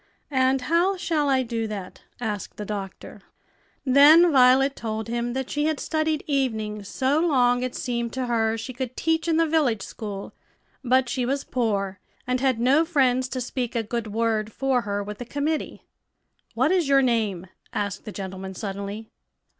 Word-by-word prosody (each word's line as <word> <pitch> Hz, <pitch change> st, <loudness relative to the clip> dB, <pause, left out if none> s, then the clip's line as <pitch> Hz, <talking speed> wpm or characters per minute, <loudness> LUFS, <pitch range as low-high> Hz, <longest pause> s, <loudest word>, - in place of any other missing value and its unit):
"And 260 Hz, -1 st, +2 dB
how 345 Hz, +7 st, +2 dB
shall 310 Hz, -5 st, 0 dB
I 265 Hz, -1 st, +3 dB
do 230 Hz, -2 st, -3 dB
that?" 200 Hz, -4 st, -7 dB, 0.2 s
asked 210 Hz, -4 st, -4 dB
the 210 Hz, -, -5 dB
doctor. 195 Hz, -2 st, -7 dB, 0.6 s
Then 300 Hz, +6 st, +7 dB
Violet 265 Hz, +1 st, +5 dB
told 220 Hz, -1 st, -4 dB
him 240 Hz, +1 st, -2 dB
that 265 Hz, 0 st, -3 dB
she 295 Hz, 0 st, 0 dB
had 310 Hz, -2 st, 0 dB
studied 310 Hz, -1 st, -1 dB
evenings 220 Hz, -8 st, -1 dB
so 270 Hz, +6 st, +1 dB
long 250 Hz, -7 st, +3 dB
it 255 Hz, 0 st, -3 dB
seemed 235 Hz, -3 st, -2 dB
to 260 Hz, -1 st, -2 dB
her 225 Hz, -2 st, +1 dB
she 255 Hz, +3 st, -6 dB
could 255 Hz, 0 st, -5 dB
teach 325 Hz, 0 st, 0 dB
in 325 Hz, -1 st, +2 dB
the 330 Hz, -, +4 dB
village 290 Hz, -10 st, +1 dB
school; 205 Hz, -3 st, -7 dB, 0.5 s
but 255 Hz, 0 st, +3 dB
she 255 Hz, +1 st, -1 dB
was 275 Hz, +3 st, -1 dB
poor, 200 Hz, -6 st, -1 dB, 0.3 s
and 255 Hz, 0 st, 0 dB
had 260 Hz, -3 st, +1 dB
no 270 Hz, +7 st, +4 dB
friends 260 Hz, -6 st, +2 dB
to 255 Hz, -, -3 dB
speak 245 Hz, 0 st, -3 dB
a 230 Hz, -, +1 dB
good 230 Hz, +1 st, -3 dB
word 220 Hz, 0 st, -1 dB
for 265 Hz, +1 st, 0 dB
her 205 Hz, -2 st, -3 dB
with 210 Hz, 0 st, -7 dB
the -, -, -4 dB
committee. 290 Hz, +5 st, -3 dB, 0.7 s
"What 260 Hz, +7 st, +2 dB
is 355 Hz, -6 st, +2 dB
your 275 Hz, -1 st, +5 dB
name?" 215 Hz, -7 st, 0 dB, 0.3 s
asked 200 Hz, -2 st, -3 dB
the 215 Hz, -, -7 dB
gentleman, 190 Hz, -1 st, -6 dB
suddenly. 200 Hz, +2 st, -6 dB
245 Hz, 175 wpm, -24 LUFS, 220-275 Hz, 0.7 s, Then